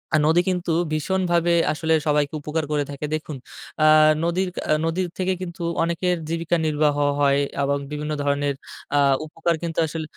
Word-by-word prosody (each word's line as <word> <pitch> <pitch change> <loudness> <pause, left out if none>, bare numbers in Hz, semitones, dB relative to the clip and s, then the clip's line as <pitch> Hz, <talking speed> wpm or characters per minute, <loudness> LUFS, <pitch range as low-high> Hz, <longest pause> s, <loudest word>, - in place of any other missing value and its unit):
আর - - +4
নদী 170 +2 +4
কিন্তু 180 -2 -1 0.2
ভীষণভাবে 175 +1 +1 0.2
আসলে 160 +1 0
সবাইকে 150 -1 +1
উপকার 155 +2 -2
করে 150 -1 +1
থাকে। 140 +2 -5
দেখুন 155 -2 -6 0.5
আ - - +6 0.4
নদীর 180 +2 0
ক্যা - - -4 0.2
নদীর 175 +2 -1
থেকে 185 0 0
কিন্তু 170 -1 -6 0.2
অনেকের 175 +1 0
জীবিকা 165 +1 0
নির্বাহ 150 -1 +1 0.2
হয়। 140 -1 +3 0.2
এবং 140 0 +1
বিভিন্ন 150 +1 -4
ধরনের 140 0 0 0.4
আ - - +4 0.3
উপকার 165 +2 -1
কিন্তু 165 -1 -2
আসল 160 +1 -5
160 Hz, 160 wpm, -23 LUFS, 150-175 Hz, 0.5 s, আ